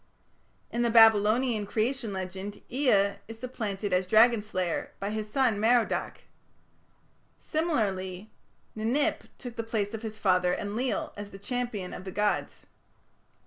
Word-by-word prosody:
In 235 - -1
the 240 - +2
Babylonian 225 0 +5
Creation 230 +2 -1
legend 190 +1 -6
Ea 200 -7 +3
is 225 0 -9
supplanted 215 -5 -4
as 180 0 +2
dragon 225 +2 +5
slayer 185 -5 -3
by 200 +1 -3
his 215 0 -4
son 245 -5 +2
Merodach. 235 +2 +1 1.2
Similarly 205 - -2 0.4
Ninip 230 +7 0
took 245 -2 -9
the - - 0
place 220 -2 -2
of 225 - -5
his 220 -2 -6
father, 180 -3 +2
Enlil, 225 +5 -2
as 205 0 -7
the 195 - -10
champion 225 -3 -4
of - - -7
the 190 - -6
gods. 210 +2 -1
215 Hz, 135 wpm, -28 LUFS, 200-235 Hz, 1.2 s, Babylonian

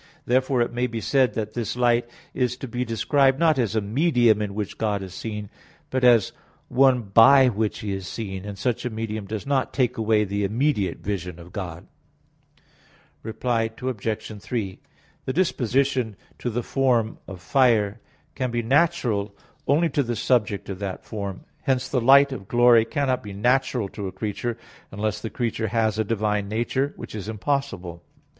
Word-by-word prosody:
Therefore 130 0 +2
it 120 - -5
may 125 +1 0
be 115 -1 -4
said 125 +4 +2
that 110 -1 -3
this 120 -2 -3
light 120 -1 +2 0.2
is 125 -1 0
to 135 - -6
be 125 +1 -2
described 130 +4 +2
not 160 -3 +3
as 115 -3 0
a 110 - +2
medium 120 -1 +3
in 100 -2 -3
which 105 -2 -4
God 105 -3 0
is 95 -2 -9
seen, 105 -1 -5 0.4
but 130 -1 -1
as 120 -4 +5 0.4
one 130 -1 +4
by 115 +6 +6
which 110 -1 -2
He 105 -2 -3
is 95 -1 -5
seen; 95 -4 -5
and 100 -1 -7
such 120 +3 -1
a 125 - -1
medium 110 -2 -4
does 110 0 -5
not 140 -2 0
take 125 -2 +1
away 110 -1 +3
the 100 0 -2
immediate 105 - 0
vision 90 -4 -4
of 85 +1 -12
God. 90 -5 -6 1.4
Reply 115 0 -1
Obj. 110 -4 -4
3: 105 -6 -4 0.5
The 130 - -2
disposition 130 - +1 0.2
to 125 - -2
the 120 +1 -2
form 120 -5 +1
of 95 -2 -8
fire 110 -1 +2 0.3
can 130 -2 -2
be 120 0 -1
natural 120 -7 +1 0.3
only 160 +4 +3
to 145 - +1
the 120 -3 -2
subject 105 -4 0
of 95 -1 -5
that 100 -2 -5
form. 100 -3 -5 0.2
Hence 130 -2 0
the 130 -2 0
light 140 +3 +6
of 95 -8 -7
glory 120 -1 +5
cannot 135 -3 0
be 100 -2 -8
natural 125 +1 +1
to 100 -1 -6
a - - -5
creature 110 +4 -3 0.3
unless 105 +1 -2
the 110 - -4
creature 115 -2 -2
has 110 0 0
a - - +3
divine 105 -2 -1
nature; 130 +6 -1
which - - -9
is 105 -1 -5
impossible. 105 - -3
115 Hz, 175 wpm, -24 LUFS, 105-130 Hz, 1.4 s, by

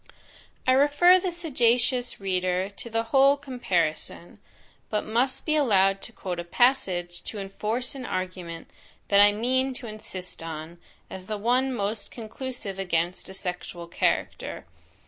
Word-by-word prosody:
I 255 - +4
refer 290 +7 +6
the 370 0 -2
sagacious 250 -6 +1
reader 185 -1 0
to 205 +4 -8
the 225 0 0
whole 275 +1 +6
comparison; 180 - -1 0.5
but 210 - -1
must 245 +4 0
be 310 - +2
allowed 195 -9 +3
to - - -5
quote 185 -6 -5
a - - -2
passage 175 -4 +1
to 220 - -6
enforce 215 +6 -2
an 270 -2 -7
argument 180 -3 -5 0.4
that 200 0 +6
I 205 0 +7
mean 260 +5 0
to 250 - -6
insist 195 -5 -6
on, 165 +1 -7 0.3
as 185 -1 -9
the 215 -1 -2
one 250 +5 +2
most 210 -2 -2
conclusive 230 -3 -6
against 175 -1 -1
a 190 - -7
sexual 180 -2 -5
character. 170 - -1
215 Hz, 145 wpm, -26 LUFS, 185-255 Hz, 0.5 s, I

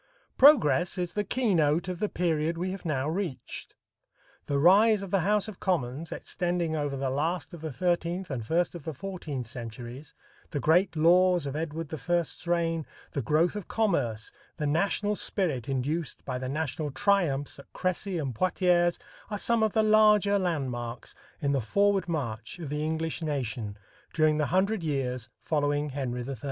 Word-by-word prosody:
Progress 190 - +5
is 175 -1 -2
the 210 - 0
keynote 175 - +1
of 180 -2 -4
the 210 - 0
period 165 -1 0
we 185 +2 -2
have 195 -1 -7
now 145 -3 0
reached. 165 -4 -4 0.7
The 140 - 0
rise 200 +7 +5
of 195 - -7
the 195 - +3
House 205 +4 +1
of 215 -4 -9
Commons, 160 -4 -1
extending 175 -3 -2
over 145 -2 -2
the 135 -1 -1
last 165 +7 -1
of 170 - -9
the 160 -1 -4
thirteenth 175 +4 -1
and 125 -4 -3
first 170 +9 +1
of 170 -4 -8
the 160 0 -5
fourteenth 155 -7 -5
centuries, 120 +3 -8 0.3
the 145 - -2
great 165 +5 +3
laws 175 +1 +4
of 140 0 -4
Edward 160 0 -4
I's 170 +1 -1
reign, 165 -2 +1 0.3
the 140 - -2
growth 155 - +2
of 205 -4 -5
commerce, 135 - 0 0.3
the 150 - -2
national 200 +7 +1
spirit 150 - -1
induced 145 +5 -2
by 125 -1 -3
the 130 0 -4
national 150 +1 -2
triumphs 145 -4 +1
at 140 - -15
Crecy 185 +1 -2
and 140 -6 -2
Poitiers 175 - +2 0.3
are 210 - -2
some 230 +2 +1
of 220 -2 +2
the 220 - +3
larger 210 -2 +5
landmarks 125 -9 -3 0.3
in 140 - +2
the 135 -2 +1
forward 200 - +2
march 120 -5 -3
of 165 -5 -6
the 150 +1 -1
English 160 +1 -2
nation 120 -9 -3 0.4
during 155 -1 +3
the 150 - +1
hundred 195 +3 +1
years 130 -6 -2
following 145 -1 0
Henry 125 -3 -3
III. 135 -2 -4
160 Hz, 170 wpm, -28 LUFS, 140-185 Hz, 0.7 s, Progress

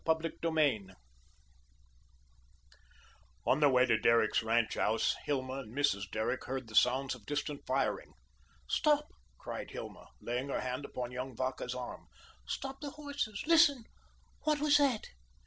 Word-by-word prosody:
CHAPTER 160 0 +1 0.2
VII 140 -12 +2 2.6
On 135 - +3
their 145 -2 +6
way 130 -1 +5
to 110 -3 +2
Derrick's 115 +1 +4
ranch 115 0 +1
house, 110 +2 +1
Hilma 130 -2 -1
and 125 -1 -9
Mrs. 100 -9 +1
Derrick 110 +4 -1
heard 130 -2 -4
the 110 - -12
sounds 130 +4 +3
of 120 -5 -12
distant 145 0 -3
firing. - - -1 0.5
"Stop!" 300 -1 +2 0.3
cried - - -6
Hilma, - - -8
laying 125 +3 -3
her - - -1
hand 130 +2 -3
upon 125 -2 -5
young 125 0 -5
Vacca's 130 0 -3
arm. 125 -1 -7 0.4
"Stop 270 0 -4
the 290 - -4
horses. 285 -8 -4
Listen, 310 -6 +5 0.6
what 305 -1 +1
was 295 0 +5
that?" 275 -7 +2
135 Hz, 140 wpm, -33 LUFS, -, 2.6 s, their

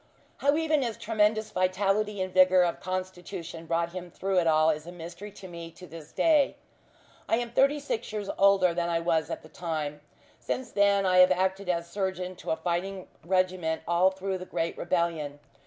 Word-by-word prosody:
How 285 +2 +2
even 315 -2 +2
his 235 -4 -2
tremendous 220 -1 +1
vitality 195 +2 +1
and 185 -1 -6
vigour 185 0 +6
of 170 -1 -1
constitution 180 -2 -5
brought 170 +1 0
him 180 0 -7
through 190 +2 0
it 170 - +1
all 155 0 +4
is 155 +1 -5
a - - -6
mystery 175 +4 -8
to 195 - -10
me 170 -1 -8
to 180 - -12
this 160 -2 -11
day. 305 -4 +3 0.7
I - - +4
am 240 -1 -3
thirty 275 +4 +3
six 280 -7 -4
years 210 -2 -4
older 195 -3 +4
than 170 0 -1
I 165 -1 +1
was 165 -2 0
at - - -5
that 155 0 -16
time. 155 -4 -4 0.4
Since 255 -2 -4
then 200 -1 +3
I 185 -1 +4
have 180 0 +8
acted 190 +1 0
as 170 -1 0
surgeon 185 -1 -3
to - - -8
a - - +2
fighting 180 +3 -3
regiment 180 -2 0
all 175 +2 +4
through 190 0 -4
the 185 - -7
great 165 -1 -2
rebellion. 170 -5 -1
185 Hz, 190 wpm, -28 LUFS, 170-200 Hz, 0.7 s, have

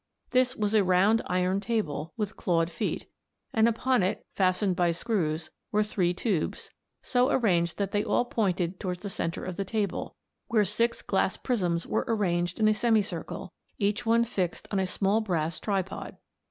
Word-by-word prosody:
This 255 0 +3
was 210 0 -1
a 215 -2 +5
round 190 +5 +4
iron 185 +1 +1
table, 195 -9 -2
with 210 -1 -2
clawed 165 -2 +1
feet, - - -2 0.5
and 220 0 +4
upon 250 +1 +1
it, 190 +4 -1
fastened 185 0 +2
by 175 -2 +2
screws, 165 -4 -1 0.2
were 210 0 +3
three 190 -4 +1
tubes, 180 -2 -2 0.3
so 250 +1 +2
arranged 175 - +2
that 200 -1 -1
they 205 0 +1
all 245 - +1
pointed 185 -6 -1
towards 180 -1 -4
the 200 - -4
centre 165 -2 -3
of 185 -2 -5
the 200 - 0
table, 200 -1 -2 0.3
where 215 -3 +3
six 230 +4 0
glass 190 -1 +1
prisms 175 -9 0
were 220 - -1
arranged 175 -5 0
in 215 - +4
a 215 - +5
semicircle, 215 -1 -1 0.2
each 205 +2 0
one 230 0 +4
fixed 190 -7 -2
on 200 - +1
a 190 - +1
small 200 +4 +1
brass 170 -6 -1
tripod. 195 -2 -3
200 Hz, 170 wpm, -28 LUFS, 180-220 Hz, 0.5 s, a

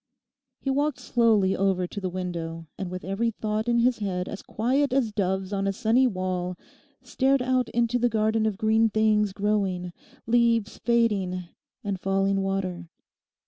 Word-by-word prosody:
He 270 - -2
walked 285 +1 0
slowly 225 -6 +2
over 190 -1 +1
to 200 +3 -7
the 185 - -2
window 170 -3 -5
and 190 -2 -5
with 185 0 -6
every 195 +5 0
thought 215 0 -3
in 235 - +3
his 240 0 +2
head 185 -3 -2
as 205 - -6
quiet 260 +5 0
as 255 -5 +1
doves 190 -1 -1
on 195 0 0
a - - +2
sunny 230 +6 +3
wall, 185 -3 -2 0.5
stared 270 0 +1
out 255 -1 +1
into 235 +1 +1
the 245 0 +2
garden 220 0 +1
of 210 -3 -2
green 220 +1 +3
things 215 -1 +2
growing, 195 -3 -1 0.3
leaves 230 -2 +2
fading 210 -6 +1 0.4
and 200 -3 -3
falling 195 +1 +1
water. 185 -3 -3
210 Hz, 160 wpm, -26 LUFS, 190-235 Hz, 0.5 s, in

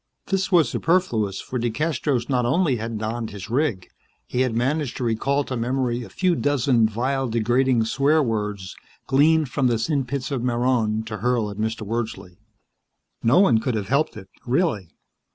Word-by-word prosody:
This 195 0 0
was 170 -4 +5
superfluous, 120 - 0
for 125 - -4
DeCastros 130 +1 -1
not 125 -2 +1
only 135 +2 +2
had 115 0 -4
donned 110 +1 -3
his 100 +1 -9
rig; 125 -8 0 0.4
he 125 - -1
had 130 -3 0
managed 135 +3 -1
to - - -3
recall 135 +5 0
to 130 - -5
memory 125 0 -1
a 120 - -9
few 185 -2 +1
dozen 130 -6 +2
vile, 130 +4 -1
degrading 120 +1 +2
swear 145 +6 +2
words 105 -5 -3 0.3
gleaned 150 +2 +3
from 130 0 +1
the 120 -2 +2
sin 140 +4 0
pits 135 +2 -4
of 135 -4 -1
Marronn, 120 -3 +1
to 110 -1 -5
hurl 115 -1 0
at 100 - -9
Mr. 110 0 -2
Wordsley. 110 -5 -4 0.8
No 115 +8 +3
one 120 - +4
could 120 +1 -2
have 105 -2 -3
helped 140 -3 +1
it, 95 -2 -10 0.2
really. 125 - 0
120 Hz, 170 wpm, -23 LUFS, 110-140 Hz, 0.8 s, was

